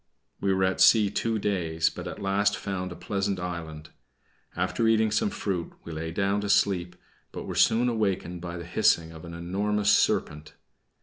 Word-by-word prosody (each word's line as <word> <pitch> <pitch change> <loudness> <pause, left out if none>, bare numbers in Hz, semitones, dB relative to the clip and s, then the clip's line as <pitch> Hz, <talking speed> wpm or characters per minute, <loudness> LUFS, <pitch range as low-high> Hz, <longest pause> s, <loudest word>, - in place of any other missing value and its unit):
We 100 - +1
were 95 0 +1
at 95 0 +1
sea 105 -3 +6
two 115 +1 -1
days, 85 -6 0
but - - -7
at - - -7
last 100 0 +1
found 90 0 -4
a - - -7
pleasant 100 -1 -2
island. 80 -3 -6 0.6
After 90 +6 0
eating 110 -1 +3
some 205 - +1
fruit, 95 - -3
we 85 - -8
lay 80 +1 -4
down 100 +4 0
to 105 - -4
sleep, 90 -3 +2 0.4
but - - -7
were - - -5
soon 120 +2 +3
awakened 95 -6 -1
by 85 0 -6
the 85 - -7
hissing 85 -1 +2
of 80 0 -11
an 85 0 -8
enormous 100 +4 0
serpent. 75 -6 +1
95 Hz, 180 wpm, -27 LUFS, 85-105 Hz, 0.6 s, sea